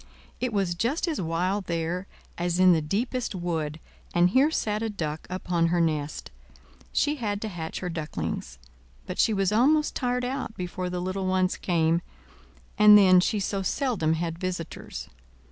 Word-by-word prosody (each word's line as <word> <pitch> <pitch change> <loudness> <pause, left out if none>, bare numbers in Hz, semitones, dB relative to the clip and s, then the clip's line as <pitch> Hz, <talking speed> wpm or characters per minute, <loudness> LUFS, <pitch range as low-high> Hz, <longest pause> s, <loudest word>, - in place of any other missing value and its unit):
It 250 -1 -1
was 195 -4 0
just 245 - -1
as 310 - -1
wild 180 +4 -1
there 170 +3 -2 0.3
as 175 +1 -1
in 185 -1 +7
the 160 - +2
deepest 230 +8 -2
wood, 160 -4 -3 0.4
and 175 +1 +4
here 270 +6 +5
sat 215 -9 -1
a 225 - -1
Duck 160 -6 -4
upon 180 -2 0
her 175 +1 +1
nest; 155 -3 -1 0.6
she 295 +1 +1
had 205 -5 -2
to - - -2
hatch 165 -5 -5
her 180 - -3
ducklings; 85 - -4 0.5
but - - -6
she - - +4
was 195 -2 +1
almost 295 +8 +3
tired 250 -1 -1
out 255 -3 -4
before 180 0 -4
the 180 0 -3
little 185 +1 -2
ones 185 0 +1
came; 165 -1 +1 0.8
and 210 0 +9
then 185 -3 +7
she 210 +4 +1
so 195 0 -1
seldom 190 - 0
had 165 0 -3
visitors. 180 -3 -5
185 Hz, 165 wpm, -26 LUFS, 170-215 Hz, 0.8 s, and